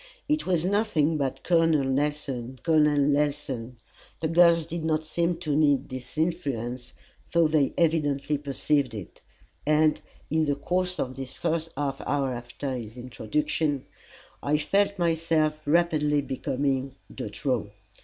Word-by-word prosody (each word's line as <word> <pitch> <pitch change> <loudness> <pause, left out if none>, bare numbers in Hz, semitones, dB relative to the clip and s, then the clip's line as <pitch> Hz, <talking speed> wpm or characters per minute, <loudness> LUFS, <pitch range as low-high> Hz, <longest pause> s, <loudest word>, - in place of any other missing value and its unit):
It 300 -5 0
was 175 -3 +1
nothing 180 -6 +2
but 135 -3 -2
Col. 165 -2 +4
Nelson, 135 -3 -1
Col. 160 -2 +4
Nelson. 145 -4 +1 0.4
The 160 - -1
girls 170 -1 +5
did 165 0 -5
not 160 -1 +1
seem 170 +2 0
to 150 -4 0
need 145 -2 +3
this 130 +3 -8
influence, 130 -7 -2 0.4
though 170 -1 +5
they 155 -3 +2
evidently 150 -3 +1
perceived 140 -2 0
it; 100 -5 -9 0.4
and, 155 +1 +3 0.3
in 160 0 +2
the 145 -1 +1
course 180 +5 -1
of 130 0 -2
the 135 +1 -5
first 165 +4 -2
half 140 -1 -2
hour 140 -3 0
after 120 +3 -5
his 115 -1 -7
introduction, 150 - -1 0.6
I 150 +1 +2
felt 200 +6 +1
myself 160 -3 +1
rapidly 150 -2 +3
becoming 135 0 -2 0.2
de - - -5
trop. - - -1
150 Hz, 135 wpm, -27 LUFS, 135-165 Hz, 0.6 s, girls